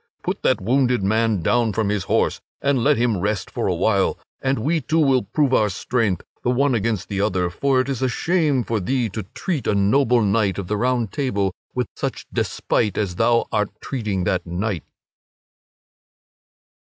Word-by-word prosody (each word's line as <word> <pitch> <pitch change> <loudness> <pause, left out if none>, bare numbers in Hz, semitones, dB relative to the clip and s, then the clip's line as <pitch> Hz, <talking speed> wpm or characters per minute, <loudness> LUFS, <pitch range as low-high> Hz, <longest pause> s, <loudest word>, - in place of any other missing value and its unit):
put - - -3
that - - +2
wounded 125 +1 +1
man 110 -2 +1
down 120 +3 +2
from 105 0 0
his 105 -2 -1
horse, - - +1 0.2
and 140 -4 +1
let 145 0 +4
him 115 -4 +1
rest 105 +1 -2
for - - -2
a 90 - +1
while, 95 +2 +1 0.2
and 135 0 +1
we 155 +8 0
two 160 +3 -1
will 135 -5 +4
prove 130 +7 0
our 105 -4 +3
strength, 105 -1 -1 0.2
the - - 0
one 135 +2 +2
against 110 -3 -1
the 100 -1 -2
other! 95 -4 0
For 135 +7 +1
it 130 - -4
is 135 -3 -3
a 130 - +2
shame 150 -2 +1
for 115 -2 -1
thee 120 +4 0
to 110 +3 -4
treat 170 -8 -2
a - - +2
noble 115 +4 +3
knight 100 -1 +1
of 100 - -3
the 105 - -1
Round 120 -1 0
Table 100 -9 -1 0.2
with 125 -1 0
such - - -4
despite 105 -3 0
as 95 -4 -2
thou 115 +1 +3
art 105 -2 +1
treating 105 -8 -2
that 90 +1 0
knight." 90 0 -3
115 Hz, 185 wpm, -22 LUFS, 100-130 Hz, 0.2 s, let